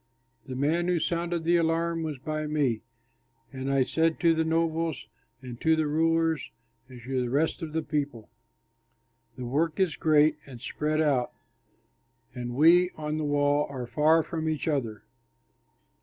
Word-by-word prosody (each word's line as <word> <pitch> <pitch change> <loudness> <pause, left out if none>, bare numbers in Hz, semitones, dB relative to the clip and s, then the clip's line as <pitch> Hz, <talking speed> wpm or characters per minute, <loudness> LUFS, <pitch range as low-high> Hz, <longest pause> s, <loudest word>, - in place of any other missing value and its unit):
The 130 - -5
man 160 +6 +1
who 180 -1 +2
sounded 170 +1 -1
the 170 +1 +3
alarm 165 0 0
was 155 -3 -4
by 155 +3 -4
me; 140 -7 0 0.7
and 130 0 -4
I 135 -1 +3
said 160 +4 0
to 170 -2 +5
the 160 0 +1
nobles 160 -4 -1 0.4
and 125 -2 -9
to 160 0 +4
the 160 -1 0
rulers 165 +1 +1 0.4
and 125 -1 -11
to 130 +1 -1
the 125 - -2
rest 145 +5 0
of 160 -2 -5
the 160 +1 -2
people, 145 -7 -3 1.1
"The 125 - -5
work 155 +7 -1
is 185 -4 +2
great 155 -1 +4
and 130 -3 -10
spread 150 +4 -1
out, 135 -5 +1 1.0
and 120 -1 -5
we 170 +5 +6
on 155 0 -3
the 155 - -2
wall 145 0 +2
are 130 -3 -5
far 155 +6 +3
from 160 -1 -3
each 155 -1 -3
other. 120 -9 -2
155 Hz, 160 wpm, -27 LUFS, 135-165 Hz, 1.1 s, we